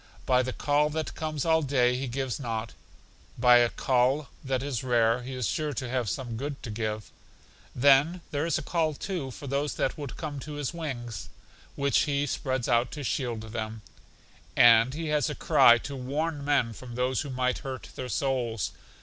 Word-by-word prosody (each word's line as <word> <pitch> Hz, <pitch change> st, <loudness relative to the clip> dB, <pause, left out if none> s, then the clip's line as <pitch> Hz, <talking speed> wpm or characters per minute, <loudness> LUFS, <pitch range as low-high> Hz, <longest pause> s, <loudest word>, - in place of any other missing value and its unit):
By 125 Hz, -1 st, +4 dB
the 130 Hz, 0 st, -2 dB
call 145 Hz, +3 st, +1 dB
that 155 Hz, +1 st, -3 dB
comes 155 Hz, -3 st, -3 dB
all 160 Hz, -1 st, +4 dB
day 125 Hz, -4 st, +2 dB
He 130 Hz, +1 st, -3 dB
gives 130 Hz, 0 st, -3 dB
nought; 115 Hz, -3 st, -4 dB, 0.6 s
by 125 Hz, 0 st, +7 dB
a 120 Hz, -1 st, +4 dB
call 130 Hz, +4 st, +1 dB
that 130 Hz, -1 st, -1 dB
is 140 Hz, -4 st, -3 dB
rare 120 Hz, -1 st, +2 dB
He 130 Hz, +1 st, -6 dB
is 125 Hz, -2 st, -2 dB
sure 150 Hz, -1 st, -1 dB
to 130 Hz, -1 st, -4 dB
have 125 Hz, -4 st, -1 dB
some 120 Hz, +2 st, -4 dB
good 140 Hz, +2 st, -5 dB
to 115 Hz, -, -5 dB
give; 110 Hz, -1 st, -4 dB, 0.6 s
then 140 Hz, +7 st, +4 dB
there 150 Hz, +2 st, -1 dB
is 170 Hz, -, +1 dB
a -, -, -4 dB
call, 160 Hz, -3 st, 0 dB
too, 175 Hz, -5 st, -4 dB
for 140 Hz, +3 st, -9 dB
those 140 Hz, +2 st, -1 dB
that 135 Hz, -, -1 dB
would 140 Hz, -4 st, -6 dB
come 150 Hz, -4 st, -5 dB
to 150 Hz, +3 st, -7 dB
His 145 Hz, -1 st, -3 dB
wings, 130 Hz, -9 st, -5 dB, 0.5 s
which 140 Hz, 0 st, +2 dB
He 140 Hz, 0 st, +1 dB
spreads 130 Hz, -2 st, -2 dB
out 120 Hz, 0 st, +2 dB
to 150 Hz, -, -5 dB
shield 120 Hz, -1 st, -2 dB
them; 110 Hz, -1 st, -4 dB, 0.7 s
and 120 Hz, +2 st, +6 dB
He 160 Hz, 0 st, -3 dB
has 150 Hz, -3 st, +1 dB
a -, -, -4 dB
cry 120 Hz, -, +6 dB
to 140 Hz, -, -5 dB
warn 145 Hz, +4 st, -2 dB
men 140 Hz, -5 st, +2 dB
from 120 Hz, 0 st, -9 dB
those 125 Hz, 0 st, 0 dB
who 145 Hz, -, -6 dB
might 125 Hz, -1 st, 0 dB
hurt 130 Hz, -2 st, -7 dB
their 130 Hz, -1 st, -5 dB
souls. 125 Hz, -6 st, -1 dB
130 Hz, 190 wpm, -28 LUFS, 120-145 Hz, 0.7 s, by